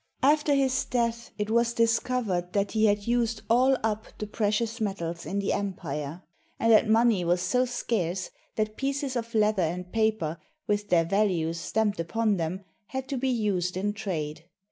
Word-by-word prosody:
After 295 Hz, +1 st, +4 dB
his 265 Hz, -1 st, +2 dB
death, 235 Hz, -1 st, -1 dB
it 210 Hz, 0 st, -2 dB
was 235 Hz, 0 st, +3 dB
discovered 225 Hz, -6 st, +1 dB
that 200 Hz, -1 st, +1 dB
he 220 Hz, 0 st, +3 dB
had 205 Hz, 0 st, +1 dB
used 235 Hz, -2 st, 0 dB
all 260 Hz, +3 st, +5 dB
up 220 Hz, 0 st, -1 dB
the 210 Hz, -, -4 dB
precious 215 Hz, +2 st, -1 dB
metals 170 Hz, -5 st, -3 dB
in 195 Hz, -, -2 dB
the 200 Hz, -1 st, 0 dB
empire, 165 Hz, -4 st, -4 dB, 0.4 s
and 230 Hz, -, +3 dB
that 215 Hz, 0 st, +5 dB
money 225 Hz, -4 st, +4 dB
was 175 Hz, +1 st, +2 dB
so 250 Hz, +8 st, +2 dB
scarce 200 Hz, -7 st, -2 dB, 0.2 s
that 215 Hz, 0 st, -1 dB
pieces 275 Hz, -1 st, -2 dB
of 230 Hz, -1 st, -4 dB
leather 210 Hz, -2 st, +3 dB
and 180 Hz, +2 st, -2 dB
paper, 215 Hz, -8 st, 0 dB, 0.3 s
with 205 Hz, 0 st, -1 dB
their 165 Hz, -2 st, +4 dB
values 170 Hz, -4 st, +1 dB
stamped 210 Hz, +2 st, 0 dB
upon 210 Hz, +5 st, +1 dB
them, 180 Hz, +3 st, -3 dB, 0.2 s
had 265 Hz, 0 st, -4 dB
to 275 Hz, -, -1 dB
be 265 Hz, +1 st, 0 dB
used 195 Hz, -7 st, 0 dB
in 205 Hz, +2 st, -1 dB
trade. 160 Hz, -7 st, -4 dB
210 Hz, 170 wpm, -27 LUFS, 180-235 Hz, 0.4 s, all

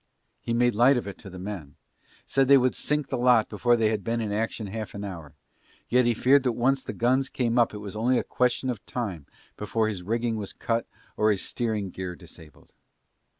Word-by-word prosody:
He -, -, -5 dB
made 120 Hz, +1 st, +3 dB
light 125 Hz, +5 st, +5 dB
of 120 Hz, -, -2 dB
it 100 Hz, -, -8 dB
to 95 Hz, -, -9 dB
the 95 Hz, -, -10 dB
men: 90 Hz, -7 st, -7 dB, 0.5 s
said 135 Hz, -1 st, +2 dB
they 140 Hz, 0 st, +8 dB
would 130 Hz, -1 st, +2 dB
sink 150 Hz, -2 st, -1 dB
the 130 Hz, -, -2 dB
lot 120 Hz, -3 st, +4 dB
before 120 Hz, +3 st, +2 dB
they 110 Hz, -2 st, +2 dB
had 105 Hz, -2 st, -2 dB
been 115 Hz, 0 st, -1 dB
in 110 Hz, -2 st, -2 dB
action 110 Hz, +1 st, -2 dB
half 105 Hz, +2 st, -6 dB
an 100 Hz, -, -5 dB
hour: 85 Hz, -7 st, -8 dB, 0.5 s
yet 125 Hz, 0 st, +4 dB
he 120 Hz, -, +2 dB
feared 135 Hz, +5 st, +4 dB
that 125 Hz, -2 st, 0 dB
once 130 Hz, +3 st, +1 dB
the -, -, -5 dB
guns 130 Hz, +3 st, +1 dB
came 120 Hz, -1 st, 0 dB
up 120 Hz, -, +3 dB
it 105 Hz, -, -7 dB
was 100 Hz, -, -7 dB
only 120 Hz, +4 st, +2 dB
a -, -, 0 dB
question 125 Hz, +1 st, 0 dB
of 110 Hz, -6 st, -7 dB
time 95 Hz, -, -4 dB, 0.3 s
before 105 Hz, +2 st, 0 dB
his 100 Hz, -4 st, -3 dB
rigging 115 Hz, +4 st, -1 dB
was 100 Hz, -2 st, -6 dB
cut 115 Hz, 0 st, -2 dB, 0.3 s
or 110 Hz, -, +2 dB
his 100 Hz, -3 st, +1 dB
steering 110 Hz, -5 st, -2 dB
gear 90 Hz, -1 st, -5 dB
disabled. 80 Hz, -3 st, -15 dB
115 Hz, 220 wpm, -26 LUFS, 100-125 Hz, 0.5 s, they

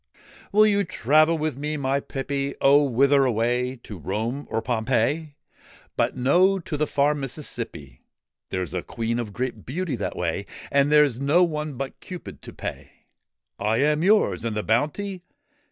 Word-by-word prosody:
' -, -, -22 dB
Will 215 Hz, +1 st, +6 dB
you 200 Hz, -1 st, +3 dB
travel 155 Hz, -, +3 dB
with 155 Hz, -4 st, -2 dB
me, 150 Hz, +1 st, -2 dB
my 140 Hz, 0 st, 0 dB
pippy? 140 Hz, 0 st, -3 dB
' -, -, -36 dB
' -, -, -43 dB
Oh! 140 Hz, +2 st, +6 dB
Whither 140 Hz, +2 st, +4 dB
away? 125 Hz, +1 st, 0 dB
To 105 Hz, -4 st, -9 dB
Rome 110 Hz, -, -3 dB
or 110 Hz, -, 0 dB
Pompeii? 125 Hz, +6 st, 0 dB, 0.2 s
' -, -, -26 dB
' -, -, -27 dB
But -, -, 0 dB
no; 180 Hz, +10 st, +4 dB
to 165 Hz, -4 st, -5 dB
the 150 Hz, +1 st, 0 dB
far 145 Hz, +1 st, +2 dB
Mississippi: 120 Hz, -, -6 dB, 0.5 s
There's 90 Hz, -4 st, -3 dB
a -, -, -1 dB
Queen 115 Hz, +1 st, -3 dB
of 115 Hz, -3 st, -4 dB
great 125 Hz, +4 st, -4 dB
beauty 160 Hz, +2 st, -3 dB
that 105 Hz, -, -3 dB
way, 90 Hz, +3 st, -2 dB, 0.2 s
And 140 Hz, +1 st, +3 dB
there 150 Hz, 0 st, +7 dB
's 120 Hz, -3 st, -6 dB
no 145 Hz, +6 st, +4 dB
one 155 Hz, -3 st, -2 dB
but 135 Hz, +1 st, -5 dB
Cupid 180 Hz, -2 st, -9 dB
to -, -, -9 dB
pay.' -, -, -7 dB, 0.4 s
' -, -, -62 dB, 0.3 s
I 110 Hz, +2 st, +1 dB
am 150 Hz, +3 st, +2 dB
yours! 210 Hz, -, +3 dB
And 115 Hz, -2 st, -2 dB
the 105 Hz, -, -1 dB
bounty 165 Hz, -, -1 dB
140 Hz, 185 wpm, -24 LUFS, 115-150 Hz, 0.5 s, there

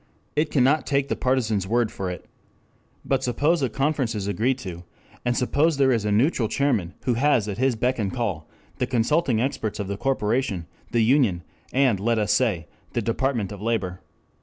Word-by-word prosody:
It 150 Hz, +1 st, +1 dB
cannot 140 Hz, +3 st, +2 dB
take 140 Hz, -1 st, +1 dB
the -, -, 0 dB
partisans' 110 Hz, -7 st, 0 dB
word 115 Hz, +1 st, +1 dB
for 95 Hz, -2 st, -4 dB
it. 90 Hz, -, -7 dB, 0.8 s
But 135 Hz, -1 st, +1 dB
suppose 145 Hz, +6 st, +1 dB
a 130 Hz, -, +1 dB
conference 135 Hz, -2 st, 0 dB
is 100 Hz, -2 st, -3 dB
agreed 115 Hz, +7 st, 0 dB
to, 90 Hz, -8 st, -7 dB, 0.4 s
and 120 Hz, -1 st, 0 dB
suppose 145 Hz, +5 st, +2 dB
there 135 Hz, -1 st, +4 dB
is 115 Hz, -4 st, +1 dB
a 105 Hz, -, 0 dB
neutral 115 Hz, +2 st, +2 dB
chairman 110 Hz, -11 st, 0 dB
who 125 Hz, -, +1 dB
has 120 Hz, -3 st, +2 dB
at 100 Hz, 0 st, -4 dB
his 130 Hz, -1 st, +2 dB
beck 125 Hz, +3 st, 0 dB
and 100 Hz, -3 st, -1 dB
call 100 Hz, -11 st, -3 dB, 0.3 s
the 125 Hz, -, 0 dB
consulting 125 Hz, +1 st, +1 dB
experts 110 Hz, -4 st, -2 dB
of 100 Hz, -, -3 dB
the 100 Hz, 0 st, -3 dB
corporation, 115 Hz, -6 st, 0 dB, 0.2 s
the 115 Hz, -1 st, +2 dB
union, 115 Hz, -8 st, +3 dB, 0.3 s
and, 130 Hz, -7 st, +3 dB
let 115 Hz, +3 st, +1 dB
us 105 Hz, -1 st, +2 dB
say, 105 Hz, -11 st, +1 dB, 0.3 s
the 120 Hz, -, -1 dB
Department 115 Hz, -2 st, -1 dB
of 100 Hz, -1 st, -8 dB
Labor. 100 Hz, -5 st, -1 dB
120 Hz, 185 wpm, -24 LUFS, 105-135 Hz, 0.8 s, there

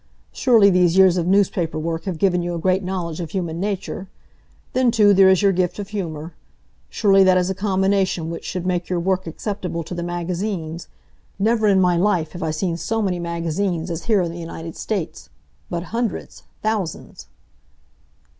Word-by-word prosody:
Surely 225 Hz, -6 st, +5 dB
these 180 Hz, -1 st, +3 dB
years 190 Hz, -2 st, +6 dB
of 175 Hz, -2 st, -1 dB
newspaper 185 Hz, -4 st, +1 dB
work 165 Hz, +1 st, -3 dB
have 185 Hz, -4 st, -3 dB
given 180 Hz, -1 st, +2 dB
you 175 Hz, 0 st, -3 dB
a -, -, -3 dB
great 185 Hz, +3 st, +1 dB
knowledge 180 Hz, -3 st, -3 dB
of 170 Hz, -3 st, -4 dB
human 170 Hz, -2 st, -3 dB
nature. 195 Hz, -1 st, -3 dB, 0.7 s
Then 255 Hz, -1 st, +3 dB
too, 210 Hz, -3 st, +5 dB
there 190 Hz, 0 st, +6 dB
is 190 Hz, +1 st, +3 dB
your 200 Hz, -, +5 dB
gift 180 Hz, -1 st, 0 dB
of 205 Hz, -1 st, -6 dB
humor. 165 Hz, -5 st, -5 dB, 0.6 s
Surely 195 Hz, -2 st, +4 dB
that 185 Hz, -1 st, +5 dB
is 180 Hz, +1 st, +1 dB
a -, -, -1 dB
combination 190 Hz, -3 st, 0 dB
which 165 Hz, -, -6 dB
should 180 Hz, -1 st, -4 dB
make 180 Hz, -1 st, -1 dB
your 180 Hz, -1 st, 0 dB
work 185 Hz, +1 st, -1 dB
acceptable 180 Hz, -1 st, -4 dB
to 165 Hz, -, -8 dB
the 175 Hz, -, -4 dB
magazines. 175 Hz, -1 st, -4 dB, 0.5 s
Never 220 Hz, +2 st, +2 dB
in 195 Hz, -2 st, +4 dB
my 180 Hz, -2 st, +3 dB
life 175 Hz, -4 st, +1 dB
have 175 Hz, -, -8 dB
I 160 Hz, -, -1 dB
seen 165 Hz, +2 st, -1 dB
so 225 Hz, +7 st, -2 dB
many 180 Hz, -3 st, -1 dB
magazines 170 Hz, +1 st, -2 dB
as 165 Hz, 0 st, -5 dB
here 215 Hz, -4 st, +3 dB
in 170 Hz, -, -3 dB
the 170 Hz, -, -8 dB
United 165 Hz, -1 st, -7 dB
States. 175 Hz, -7 st, -4 dB, 0.4 s
But 170 Hz, -1 st, -3 dB
hundreds! 235 Hz, -1 st, -3 dB, 0.2 s
Thousands!" 215 Hz, -7 st, -3 dB
180 Hz, 185 wpm, -21 LUFS, 170-195 Hz, 0.7 s, years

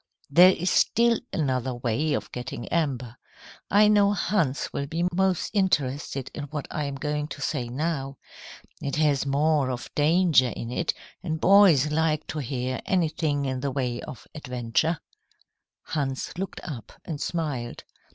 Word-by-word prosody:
"There 175 Hz, +5 st, +8 dB
is 180 Hz, +2 st, -1 dB
still 235 Hz, 0 st, +3 dB
another 130 Hz, -5 st, -1 dB
way 120 Hz, +6 st, 0 dB
of -, -, -3 dB
getting 120 Hz, -1 st, -6 dB
amber. 130 Hz, -8 st, -1 dB, 0.5 s
I 210 Hz, +1 st, +6 dB
know 205 Hz, -1 st, +4 dB
Hans 170 Hz, -8 st, 0 dB
will 140 Hz, -, -2 dB
be 165 Hz, +4 st, -1 dB
most 190 Hz, -1 st, +1 dB
interested 145 Hz, -, 0 dB
in 145 Hz, -, -5 dB
what 145 Hz, 0 st, -5 dB
I 150 Hz, -, -2 dB
am 140 Hz, -1 st, -4 dB
going 150 Hz, +1 st, -2 dB
to 145 Hz, -, -8 dB
say 140 Hz, -5 st, -2 dB
now. 135 Hz, 0 st, -2 dB, 0.6 s
It 140 Hz, -, -2 dB
has 145 Hz, -3 st, +2 dB
more 145 Hz, 0 st, +2 dB
of 125 Hz, -1 st, -5 dB
danger 155 Hz, -4 st, +4 dB
in 115 Hz, -, -5 dB
it, 165 Hz, +6 st, -1 dB, 0.3 s
and 160 Hz, -4 st, -3 dB
boys 175 Hz, -7 st, +6 dB
like 155 Hz, -1 st, +1 dB
to 155 Hz, -, -3 dB
hear 130 Hz, -1 st, -3 dB
anything 155 Hz, -5 st, 0 dB
in 130 Hz, -1 st, -2 dB
the 140 Hz, +2 st, -1 dB
way 125 Hz, -3 st, -2 dB
of 120 Hz, -, -9 dB
adventure." 125 Hz, +3 st, -1 dB, 0.9 s
Hans 135 Hz, -2 st, -3 dB
looked 190 Hz, +1 st, -5 dB
up 130 Hz, -9 st, -7 dB
and 155 Hz, -4 st, -5 dB
smiled. 145 Hz, -8 st, -3 dB
145 Hz, 150 wpm, -26 LUFS, 130-165 Hz, 0.9 s, There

